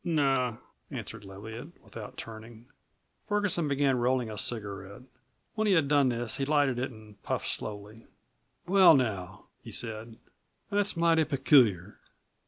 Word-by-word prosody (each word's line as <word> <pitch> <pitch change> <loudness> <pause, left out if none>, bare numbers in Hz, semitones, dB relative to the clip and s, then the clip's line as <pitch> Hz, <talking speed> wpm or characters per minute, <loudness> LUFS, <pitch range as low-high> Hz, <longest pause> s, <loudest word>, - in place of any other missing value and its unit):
"No," 135 -8 +1 0.3
answered 115 -2 -7
Leviatt, 110 - -9
without 110 -3 -10
turning. 115 +1 -10 0.6
Ferguson 205 -6 +1
began 140 -2 +2
rolling 125 -2 +1
a 105 - -7
cigarette. 100 -1 -4 0.5
When 220 -1 0
he 200 - +4
had 160 -5 +3
done 140 -2 +4
this 120 -2 -2
he 135 - -1
lighted 145 -4 +2
it 130 - -1
and 110 -3 -15
puffed - - -2
slowly. 105 +1 -6 0.6
"Well, 185 -2 +7
now," 95 -8 -2 0.2
he - - -11
said, 110 0 -4 0.5
"that's 205 -2 0
mighty 165 -1 +4
peculiar. 120 - +3
120 Hz, 135 wpm, -29 LUFS, 110-145 Hz, 0.6 s, Well